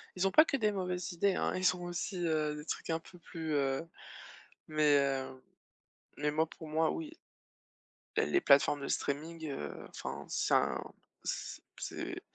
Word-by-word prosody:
Ils 185 Hz, +1 st, +2 dB
ont 190 Hz, -, 0 dB
pas 310 Hz, -, +8 dB
que 285 Hz, -3 st, 0 dB
des 215 Hz, -4 st, +2 dB
mauvaises 180 Hz, -2 st, -2 dB
idées, 190 Hz, +3 st, +2 dB
hein, -, -, 0 dB
ils 185 Hz, 0 st, +3 dB
ont 180 Hz, -, -7 dB
aussi, 175 Hz, +2 st, -3 dB
heu, 155 Hz, -2 st, +1 dB
des 150 Hz, -, -8 dB
trucs -, -, -4 dB
un 160 Hz, 0 st, +1 dB
peu 180 Hz, +2 st, -15 dB
plus, 160 Hz, -2 st, -4 dB
heu, 140 Hz, +2 st, +1 dB, 0.8 s
mais 150 Hz, -1 st, +4 dB
heu, 135 Hz, -1 st, -1 dB, 0.8 s
mais 150 Hz, 0 st, +1 dB
moi 155 Hz, +2 st, +2 dB
pour 160 Hz, -, -10 dB
moi, 160 Hz, +1 st, +2 dB
oui, 320 Hz, -1 st, -4 dB
heu -, -, -24 dB, 1.0 s
ben -, -, +2 dB
les 360 Hz, 0 st, +3 dB
plateformes 140 Hz, +1 st, +5 dB
de 140 Hz, -, -3 dB
streaming, 160 Hz, +3 st, -2 dB
heu, 75 Hz, -, -5 dB
enfin -, -, -6 dB
c'est -, -, 0 dB
un -, -, +3 dB, 0.4 s
c -, -, -4 dB, 0.2 s
c'est -, -, -4 dB
160 Hz, 180 wpm, -33 LUFS, 150-180 Hz, 1.0 s, pas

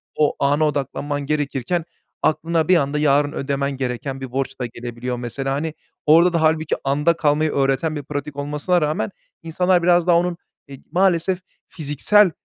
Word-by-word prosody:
o 150 Hz, -1 st, +2 dB
ana 145 Hz, +3 st, +2 dB
odaklanman 145 Hz, 0 st, -3 dB
gerekirken, 150 Hz, +3 st, -1 dB, 0.4 s
aklına 165 Hz, +1 st, +1 dB
bir 185 Hz, -, +5 dB
anda 145 Hz, 0 st, 0 dB
yarın 145 Hz, 0 st, +3 dB
ödemen 140 Hz, 0 st, -2 dB
gereken 135 Hz, +1 st, -4 dB
bir 130 Hz, -2 st, -6 dB
borç 135 Hz, 0 st, -3 dB
da -, -, 0 dB
gelebiliyor 120 Hz, +1 st, -5 dB
mesela. 130 Hz, +3 st, -3 dB
Hani 155 Hz, +3 st, -2 dB, 0.3 s
orda 170 Hz, +3 st, +6 dB
da 170 Hz, -, +1 dB
hâlbuki 155 Hz, 0 st, +2 dB
anda 145 Hz, +5 st, +2 dB
kalmayı 155 Hz, 0 st, +2 dB
öğreten 135 Hz, +3 st, +1 dB
bir 145 Hz, -, -5 dB
pratik 145 Hz, 0 st, -5 dB
olmasına 150 Hz, +5 st, 0 dB
rağmen 155 Hz, +6 st, -1 dB, 0.3 s
insanlar 180 Hz, +2 st, +1 dB
biraz 175 Hz, 0 st, +4 dB
daha 170 Hz, -, +5 dB
onun, 175 Hz, 0 st, 0 dB, 0.3 s
eee, 135 Hz, -1 st, -11 dB
maalesef 185 Hz, 0 st, +2 dB, 0.3 s
fiziksel, 170 Hz, +5 st, +2 dB
150 Hz, 160 wpm, -21 LUFS, 135-165 Hz, 0.4 s, orda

